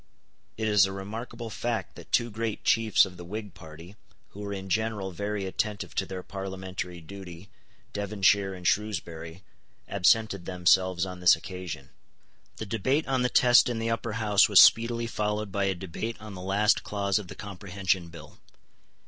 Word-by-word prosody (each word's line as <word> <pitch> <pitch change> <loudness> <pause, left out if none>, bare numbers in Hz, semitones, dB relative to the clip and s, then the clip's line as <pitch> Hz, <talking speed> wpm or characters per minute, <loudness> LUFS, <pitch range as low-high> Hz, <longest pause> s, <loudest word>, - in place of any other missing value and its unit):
It 110 0 -1
is 105 -3 +5
a - - -5
remarkable 115 +4 -6
fact 115 -4 -3
that - - -13
two 120 -1 +2
great 110 0 -3
chiefs 110 -2 +4
of 90 -2 -11
the 90 - -8
Whig 105 +2 -6
party, 85 +3 -12 0.3
who 100 - -13
were 100 0 -5
in 95 -1 -5
general 105 -1 -1
very 100 +2 -3
attentive 105 +2 -3
to - - -1
their 95 -1 -6
parliamentary 95 -2 -6
duty, 90 +1 -10 0.4
Devonshire 100 -1 +1
and 90 -1 -4
Shrewsbury, 85 -4 -2 0.4
absented 100 0 +2
themselves 90 0 +2
on 90 -1 -7
this 90 -1 +6
occasion. 85 -6 -8 0.7
The 110 - -5
debate 130 +9 0
on 130 -1 +1
the 125 - +2
Test 125 0 +5
in 120 - -2
the 115 0 -1
Upper 115 -1 -2
House 105 -3 +4
was 100 - +7
speedily 115 0 +6
followed 105 -2 -2
by 100 +1 0
a 95 -1 0
debate 95 +6 -5
on 110 -1 -9
the 90 - -8
last 100 +3 +2
clause 100 0 0
of 100 - -9
the - - -9
Comprehension 95 -2 -2
Bill. 85 0 -13
100 Hz, 170 wpm, -27 LUFS, 95-110 Hz, 0.7 s, was